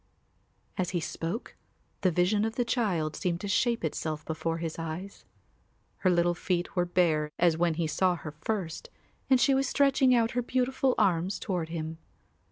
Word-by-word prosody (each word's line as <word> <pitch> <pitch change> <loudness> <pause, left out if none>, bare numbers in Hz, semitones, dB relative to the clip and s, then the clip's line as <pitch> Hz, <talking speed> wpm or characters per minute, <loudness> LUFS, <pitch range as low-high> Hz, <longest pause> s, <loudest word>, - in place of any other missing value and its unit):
As 180 - +1
he - - +1
spoke 170 +7 -4 0.5
the 190 - +4
vision 180 +5 +2
of 225 +1 -2
the 245 - 0
child 180 - 0
seemed 175 -2 -1
to 205 - -4
shape 235 +2 +1
itself 155 0 -3
before 165 +1 -2
his 165 -1 -4
eyes. 165 +5 -6 0.7
Her 185 - +2
little 175 -1 +3
feet 175 +1 -2
were 180 -1 +2
bare 165 -4 +2
as 170 -2 +4
when 170 -1 +1
he 165 0 0
saw 180 +4 +2
her 155 -2 -7
first 165 +2 -4 0.4
and 260 -2 +5
she 275 - +4
was 270 0 +1
stretching 270 -2 +4
out 230 -1 +2
her 245 - 0
beautiful 260 +1 +1
arms 180 0 +2
toward 180 -5 -3
him. 160 -1 -5
180 Hz, 175 wpm, -29 LUFS, 165-225 Hz, 0.7 s, and